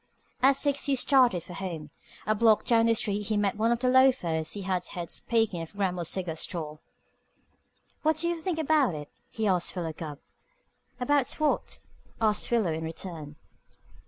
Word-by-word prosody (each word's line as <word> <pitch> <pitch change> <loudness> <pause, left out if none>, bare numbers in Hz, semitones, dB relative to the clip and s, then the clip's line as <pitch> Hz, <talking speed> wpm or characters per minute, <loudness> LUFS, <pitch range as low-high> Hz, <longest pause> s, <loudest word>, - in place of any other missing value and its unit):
At 270 +2 +5
six 280 0 0
he 280 - +2
started 250 - +3
for 180 - -10
home. 165 -5 -6 0.3
A 215 - +2
block 220 0 +3
down 230 -1 +4
the 230 - +4
street 205 -1 -1
he 215 - 0
met 205 -1 +1
one 225 +2 +1
of 235 0 0
the 255 - +1
loafers 250 -12 +3
he 205 - -5
had 185 -1 -1
heard 175 -2 -6
speaking 225 -7 0
in 165 - -5
Grammill's 180 -3 -2
Cigar 180 -4 -1
Store. 155 -2 -4 1.2
"What 315 0 +2
do 340 +2 0
you 340 -1 -2
think 360 -1 -2
about 300 - +2
it?" 150 -1 -7 0.2
he 220 - -3
asked 185 -4 +1
Philo 170 -4 -3
Gubb. 155 -2 -7 0.8
"About 270 +1 +2
what?" 310 -1 -1 0.4
asked 215 -2 +1
Philo 220 -9 +1
in 160 +1 -4
return. 160 -2 -6
205 Hz, 175 wpm, -28 LUFS, 170-250 Hz, 1.2 s, At